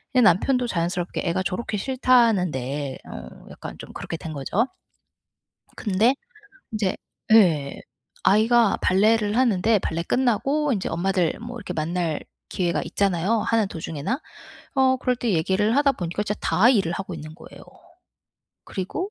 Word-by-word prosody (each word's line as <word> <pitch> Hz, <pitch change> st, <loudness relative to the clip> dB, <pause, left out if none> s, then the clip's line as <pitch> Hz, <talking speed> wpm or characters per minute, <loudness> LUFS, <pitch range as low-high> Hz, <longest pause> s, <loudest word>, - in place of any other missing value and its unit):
예 250 Hz, -, +6 dB
남편도 240 Hz, +6 st, +3 dB
자연스럽게 175 Hz, -1 st, -2 dB
"애가 180 Hz, +3 st, 0 dB
저렇게 210 Hz, +3 st, -3 dB
싫다는데." 180 Hz, -, +1 dB
어 60 Hz, -1 st, -10 dB
약간 -, -, -9 dB
좀 -, -, -10 dB
그렇게 -, -, -5 dB
된 160 Hz, -, -7 dB
거죠. 165 Hz, -, 0 dB, 1.1 s
근데 220 Hz, +5 st, +2 dB, 0.6 s
인제 210 Hz, -4 st, -1 dB, 0.4 s
예. 160 Hz, -10 st, +4 dB, 0.4 s
아이가 225 Hz, +2 st, +4 dB
발레를 210 Hz, +3 st, +3 dB
하는데 225 Hz, -3 st, +3 dB
발레 165 Hz, -2 st, -2 dB
끝나고 265 Hz, -, +1 dB
이제 195 Hz, -, -2 dB
엄마들 180 Hz, 0 st, 0 dB
뭐 240 Hz, +1 st, -7 dB
이렇게 200 Hz, -5 st, -6 dB
만날 165 Hz, 0 st, -2 dB, 0.3 s
기회가 175 Hz, -2 st, -1 dB
있잖아요, 200 Hz, +3 st, 0 dB
하는 225 Hz, -1 st, +1 dB
도중에나. 165 Hz, -, -4 dB, 0.6 s
어 260 Hz, -1 st, +4 dB
그럴 250 Hz, -1 st, 0 dB
때 230 Hz, -4 st, -1 dB
얘기를 190 Hz, +7 st, +1 dB
하다 285 Hz, -1 st, +4 dB
보니까 175 Hz, -2 st, -3 dB
진짜 210 Hz, 0 st, -3 dB
다 215 Hz, +6 st, +3 dB
일을 200 Hz, -9 st, +3 dB
하고 195 Hz, +2 st, -5 dB
있는 155 Hz, +1 st, -9 dB
거예요. -, -, -14 dB, 1.0 s
그리고 265 Hz, -, -4 dB
200 Hz, 310 characters per minute, -24 LUFS, 170-235 Hz, 1.1 s, 예